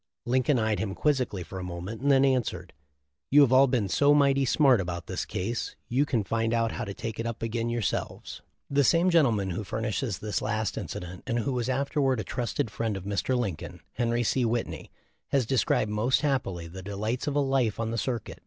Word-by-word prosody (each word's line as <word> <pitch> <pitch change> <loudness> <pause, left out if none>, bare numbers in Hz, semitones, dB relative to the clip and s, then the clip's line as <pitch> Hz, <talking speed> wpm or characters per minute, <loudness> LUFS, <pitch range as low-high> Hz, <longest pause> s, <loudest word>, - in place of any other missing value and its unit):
Lincoln 130 +3 +2
eyed 110 -2 +1
him 100 -3 -3
quizzically 125 - 0
a 95 - -5
moment, 90 +5 -6
and 140 - +1
then 135 -1 +5
answered, 115 -9 -1 0.6
"You 145 - +7
have 135 -3 +5
all 135 +1 +7
been 125 -6 +1
so 140 - +4
'mighty 140 -1 +4
smart 130 -4 +4
about 85 -1 -4
this - - -3
case 115 +6 -3
you 135 +4 +2
can 120 -7 +1
find 115 +2 0
out 115 -1 +1
how 120 - -4
to 100 - -5
take 115 -1 -5
it 115 - -2
up 115 -1 -5
again 115 +1 -1
yourselves."* 120 -3 -3 0.3
The 140 0 +2
same 170 +6 +4
gentleman 115 - +3
who 95 +5 -3
furnishes 110 0 -2
this 105 -1 -3
last 110 -1 -1
inci - - -5
dent, 90 +1 -8
and 115 - 0
who 120 +3 -1
was 125 0 -1
afterward 135 -1 +1
a - - -2
trusted 120 -3 -2
friend 110 -2 -2
of 95 - -7
Mr. 100 +6 -1
Lincoln, 100 -10 -4
Henry 120 0 0
C. 125 +3 +1
Whitney, 115 0 -2 0.4
has 135 -3 +1
described 110 -3 +1
most 110 +5 +2
happily 130 - -1
the 95 +3 -9
delights 105 +7 -3
of 145 - -1
a - - +3
life 135 -6 +1
on 115 -1 -1
the 115 - -2
circuit. 120 -3 -3
115 Hz, 210 wpm, -27 LUFS, 105-130 Hz, 0.6 s, You